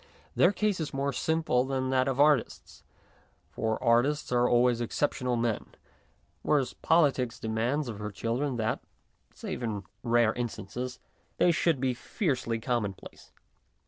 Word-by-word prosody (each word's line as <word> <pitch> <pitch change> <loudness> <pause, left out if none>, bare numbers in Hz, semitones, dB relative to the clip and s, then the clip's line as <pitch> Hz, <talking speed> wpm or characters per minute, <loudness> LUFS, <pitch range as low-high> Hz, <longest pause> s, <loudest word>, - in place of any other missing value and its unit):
Their 175 - +5
case 205 -1 0
is 155 -3 -4
more 140 +1 -1
simple 160 -3 +1
than 130 -1 -2
that 130 0 +2
of 135 0 -1
artists, 145 -4 +2 0.7
for 110 0 -1
artists 125 +6 +2
are 125 0 +3
always 120 0 +3
exceptional 125 +1 -1
men, 115 -2 -2 0.7
whereas 140 -5 +1
politics 140 -7 +2
demands 120 +6 -1
of 110 -3 -6
her 105 0 -4
children 120 +7 -2
that, 110 -1 -1 0.6
save - - -5
in 105 -4 -3 0.2
rare 120 -2 +3
instances, 120 +2 -5 0.4
they 175 - +4
should 165 -3 +1
be 130 -1 +1
fiercely 125 - -2
common 110 -4 -1
place. - - -14
125 Hz, 140 wpm, -29 LUFS, 115-140 Hz, 0.7 s, Their